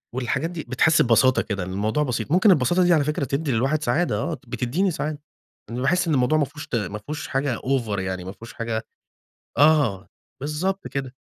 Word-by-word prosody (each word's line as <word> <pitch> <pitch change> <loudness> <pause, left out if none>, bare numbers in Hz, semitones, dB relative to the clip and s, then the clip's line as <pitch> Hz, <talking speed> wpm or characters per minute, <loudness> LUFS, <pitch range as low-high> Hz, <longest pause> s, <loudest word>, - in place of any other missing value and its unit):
والحاجات 135 +6 -1
دي 165 -4 -6
بتحس 155 +5 +3
ببساطة 120 +2 +4
كده 100 -3 -3
إن 90 - -6
الموضوع 110 +9 0
بسيط، 125 -2 -3
ممكن 190 +4 +5
البساطة 175 +3 +3
دي 175 0 +4
على 155 -3 +3
فكرة 150 -1 -1
تدّي 140 +3 -1
للواحد 135 +6 +1
سعادة 155 +9 +1
آه، 170 - -2
بتديني 125 - 0
سعادة. 150 -2 -3 0.5
إن 120 +2 -4
باحس 175 +6 +2
إن 160 - +1
الموضوع 135 +3 +3
ما 150 - +2
فيهوش 150 +3 -10
ت 135 - -3
ما 105 -2 -2
فيهوش 150 +8 -6
حاجة 135 -3 -1
over 120 -6 -1
يعني 95 -1 -3
ما 95 - -6
فيهوش 115 +4 -12
حاجة 115 -1 -3 0.7
آه. 140 - +3 0.3
بالضبط 170 +7 -2
كده. 135 -2 -4
135 Hz, 195 wpm, -23 LUFS, 115-155 Hz, 0.7 s, ممكن